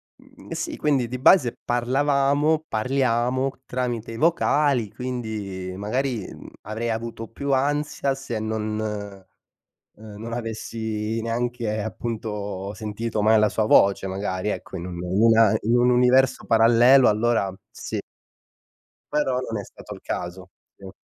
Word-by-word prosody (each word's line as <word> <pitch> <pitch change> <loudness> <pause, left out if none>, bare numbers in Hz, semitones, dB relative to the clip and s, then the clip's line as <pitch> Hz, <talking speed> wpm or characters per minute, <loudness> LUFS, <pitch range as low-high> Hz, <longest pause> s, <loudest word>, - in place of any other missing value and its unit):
mhmm, - - -18
sì - - -4
quindi 140 -5 +1
di 125 +2 -5
base 130 -2 +4
parlavamo, 140 +5 +1
parliamo 125 +2 0 0.2
tramite 120 -3 -3
i 115 - -6
vocali, 145 - +2
quindi 110 -7 -5
magari, 115 +2 -2
mhmm, - - -11
avrei 115 +2 -3
avuto 115 0 -5
più 140 +5 -4
ansia 140 +1 0
se 135 -4 -5
non, 110 0 -2
uhm, 100 -3 -7 0.7
non 115 +1 -6
avessi 110 -1 -3
neanche 115 -1 -2
appunto 105 -3 -4
sentito 110 +1 -3
mai 110 +1 +5
la 105 0 +4
sua 110 +1 0
voce, 100 -2 +4
magari 95 0 -3
ecco, 95 - -5
in 85 +1 -6
un 90 - -6
in 90 +3 0
una 115 -2 +5
in 115 +3 +2
un 125 +1 +4
universo 125 +2 +3
parallelo 120 +3 +6
allora 105 -3 +1
sì - - -5 1.1
però 135 -4 +1
non 115 -4 -4
è - - -5
stato - - -11
il - - -14
caso, 90 +1 -5 0.3
sì. 95 -1 -10
115 Hz, 135 wpm, -24 LUFS, 105-125 Hz, 1.1 s, parallelo